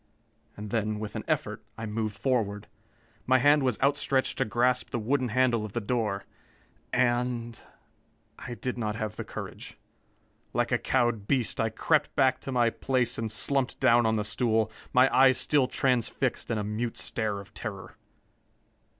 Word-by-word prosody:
And 105 0 -7
then, 110 -2 0
with 105 0 -6
an - - -3
effort, - - -1 0.2
I 115 - -5
moved 110 -1 -3
forward. 110 -6 -1 0.6
My 130 0 +5
hand 145 +3 +5
was 125 -6 0
outstretched 140 -1 +1
to 130 - +2
grasp 125 +3 +1
the 120 - -2
wooden 125 +3 0
handle 120 -1 +2
of 105 -2 -7
the 120 - 0
door. 105 -3 -1 0.7
And 120 -2 0 0.8
I 120 - -6
did 125 0 -4
not 105 -2 -2
have 110 -1 -4
the - - -5
courage. - - -8 0.8
Like - - 0
a - - +2
cowed 120 -5 0
beast 130 -5 +1
I 110 - +1
crept 150 +7 +1
back 130 -2 +3
to 135 - -6
my 120 -2 +3
place 130 -2 0
and 110 -1 -2
slumped 135 +3 0
down 120 0 +4
on 110 - +2
the 105 - 0
stool, 110 +1 +1 0.2
my 125 +1 +6
eyes 130 0 +6
still 140 -4 +2
transfixed 130 -1 0
in 115 - 0
a 105 - -1
mute 110 +3 -3
stare 105 -3 -2
of 100 - -13
terror. 100 -5 -7
120 Hz, 165 wpm, -28 LUFS, 110-130 Hz, 0.8 s, my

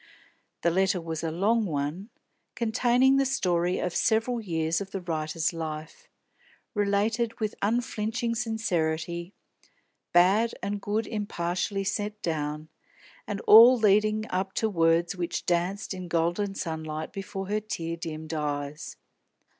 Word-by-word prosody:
The 170 - +3
letter 190 +1 +2
was 165 -1 -5
a 165 - 0
long 210 +8 +2
one, 155 +6 -3 0.5
containing 245 +3 +3
the 275 - +4
story 180 -8 +1
of 180 -1 -2
several 230 +1 +1
years 165 -3 -1
of 195 - -6
the 195 - -4
writer's 160 -1 -2
life, 155 -1 -6 0.7
related 210 +3 0
with 215 -2 -1
unflinching 230 +1 -1
sincerity, 170 -6 -2 0.8
bad 195 +7 +4
and 200 +1 -2
good 210 +2 -1
impartially 195 -2 -2
set 205 +2 -2
down, 155 -1 -3 0.6
and 205 0 -3
all 235 +4 +9
leading 215 0 +3
up 190 +1 -1
to 220 -1 0
words 165 +1 +2
which 175 -1 -3
danced 180 +4 -1
in 185 -1 -6
golden 175 +4 0
sunlight 160 -2 -4
before 195 0 -5
her 210 +1 +1
tear 170 -6 -4
dimmed 160 -1 -6
eyes. 145 -1 -3
190 Hz, 130 wpm, -27 LUFS, 165-215 Hz, 0.8 s, all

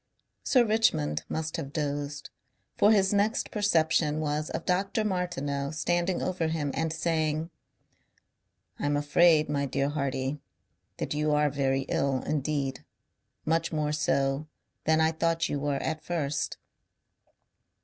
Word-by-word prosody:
Sir 250 -3 +4
Richmond 80 - +1
must 160 0 -3
have 140 -4 -5
dozed, 145 -1 -3 0.4
for 205 - +5
his 195 -2 +3
next 205 +3 +1
perception 160 -6 +2
was 150 0 -1
of - - -4
Dr. 195 +4 0
Martineau 145 -8 -2
standing 175 +3 0
over 180 -3 -1
him 155 -3 -1
and 160 0 -1
saying 160 0 -1 1.3
"I - - -1
am 145 0 +2
afraid, 155 +2 +4
my 140 -1 -1
dear 140 +1 0
Hardy, 140 -1 -2 0.6
that - - -3
you 150 0 +1
are 150 -1 +3
very 135 -1 +1
ill 135 -1 0
indeed. 140 -2 -2 0.6
Much 165 +1 +1
more 150 -2 0
so 140 -1 0 0.4
than 160 0 +3
I 160 0 +4
thought 165 +1 0
you 145 - -1
were 145 0 -1
at 155 +2 -3
first." 155 -4 -2
155 Hz, 135 wpm, -28 LUFS, 145-170 Hz, 1.3 s, for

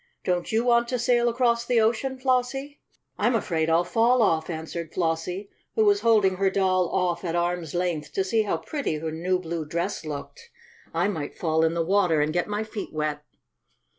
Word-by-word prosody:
"Don't 180 -1 -1
you 225 +1 +2
want 235 -1 +3
to 250 - -1
sail 240 0 +2
across 235 -1 +1
the 240 -1 +2
ocean, 240 +4 +1
Flossie?" 265 +2 -1 0.4
"I'm 240 - +2
afraid 165 -7 0
I'll 165 +2 +4
fall 230 +6 +3
off!" 160 -5 +1
answered 160 0 -5
Flossie, 175 +3 -2 0.2
who 440 - +3
was 405 -1 +4
holding 205 -5 +3
her 195 0 +2
doll 185 -2 +1
off 180 -2 0
at 170 -2 -2
arm's 175 -2 -1
length 175 -4 -2
to 195 - +1
see 220 +4 +1
how 205 -6 -1
pretty 280 - -3
her 160 +1 -4
new 180 +4 0
blue 170 -2 -4
dress 170 +6 -3
looked. 160 - -7 0.4
"I - - +1
might 160 -8 -4
fall 160 -1 +1
in 165 +1 +2
the 165 -1 0
water 180 -4 +3
and 150 +1 +1
get 175 0 0
my 210 +1 -2
feet 220 -1 -6
wet." 150 -1 -2
185 Hz, 195 wpm, -25 LUFS, 165-235 Hz, 0.4 s, I'll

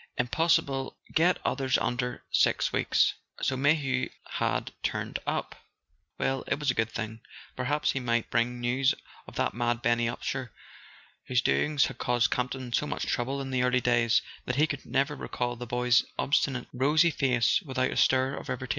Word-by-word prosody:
Impossible 135 0 +1 0.2
get 175 +3 +4
others 130 -2 +1
under 125 0 -2
six - - +2
weeks." - - +3 0.3
So 130 - +1
Mayhew 135 -2 +1 0.2
had - - -1
turned - - -2
up! - - -2 0.6
Well, 135 -1 0
it - - 0
was 145 -3 +2
a - - -3
good 110 0 0
thing: 110 0 -5 0.3
perhaps 145 +4 0
he 135 - -2
might 120 -2 -1
bring 120 +1 +1
news 130 +3 +2 0.3
of - - -12
that - - 0
mad 120 +1 -1
Benny 120 0 +2
Upsher 125 +1 -3 0.8
whose 125 -1 +2
doings 150 -2 +2
had 130 -3 -6
caused 120 -1 +2
Campton 125 0 -2
so 150 - +1
much - - -3
trouble 135 +2 -1
in 135 -1 -5
the 130 -1 +1
early 125 0 +3
days 120 -2 +3 0.2
that 125 - -1
he 150 +3 +4
could 145 -3 -6
never 140 +2 +1
recall 120 -3 -3
the 120 +1 -7
boy's 125 +1 +3
obstinate 135 -2 +1
rosy 150 +6 +3
face 125 - +2
without 130 -6 -1
a - - -4
stir 130 +1 +3
of - - -8
irritation. 125 0 -4
130 Hz, 175 wpm, -28 LUFS, 120-135 Hz, 0.8 s, get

